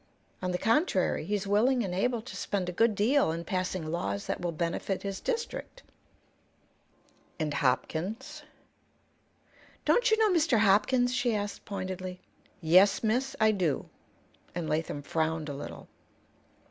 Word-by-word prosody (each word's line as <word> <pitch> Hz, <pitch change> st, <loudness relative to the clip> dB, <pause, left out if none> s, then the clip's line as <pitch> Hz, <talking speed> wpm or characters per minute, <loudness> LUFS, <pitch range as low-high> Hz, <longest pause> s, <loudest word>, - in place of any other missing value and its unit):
On 185 Hz, -, -1 dB
the 180 Hz, -, 0 dB
contrary, 230 Hz, -, +1 dB
he's 205 Hz, -1 st, -1 dB
willing 235 Hz, +5 st, +3 dB
and 180 Hz, -, -4 dB
able 230 Hz, +4 st, 0 dB
to 260 Hz, -, -9 dB
spend 195 Hz, -4 st, -2 dB
a -, -, -2 dB
good 225 Hz, +4 st, +2 dB
deal 230 Hz, -, +3 dB
in 165 Hz, +1 st, -4 dB
passing 185 Hz, -1 st, -2 dB
laws 100 Hz, -12 st, -2 dB
that -, -, -3 dB
will 175 Hz, -1 st, -1 dB
benefit 170 Hz, +4 st, -2 dB
his 195 Hz, -1 st, -4 dB
district." 475 Hz, +1 st, -4 dB, 1.6 s
"And 155 Hz, -2 st, -1 dB
Hopkins?" 175 Hz, -, -1 dB, 1.4 s
"Don't 485 Hz, 0 st, +4 dB
you 440 Hz, -, +4 dB
know 435 Hz, -2 st, +4 dB
Mr. 325 Hz, -8 st, +3 dB
Hopkins?" 220 Hz, +5 st, +3 dB
she 245 Hz, -3 st, +1 dB
asked, 205 Hz, 0 st, -4 dB
pointedly. 185 Hz, -2 st, -5 dB, 0.4 s
"Yes, 185 Hz, +7 st, +5 dB
miss; 250 Hz, +5 st, 0 dB
I 220 Hz, 0 st, +5 dB
do." 175 Hz, -9 st, -1 dB, 0.7 s
And 170 Hz, -3 st, -3 dB
Latham 155 Hz, -2 st, -2 dB
frowned 160 Hz, 0 st, -1 dB
a -, -, -4 dB
little. 140 Hz, -, -8 dB
195 Hz, 140 wpm, -29 LUFS, 170-240 Hz, 1.6 s, Yes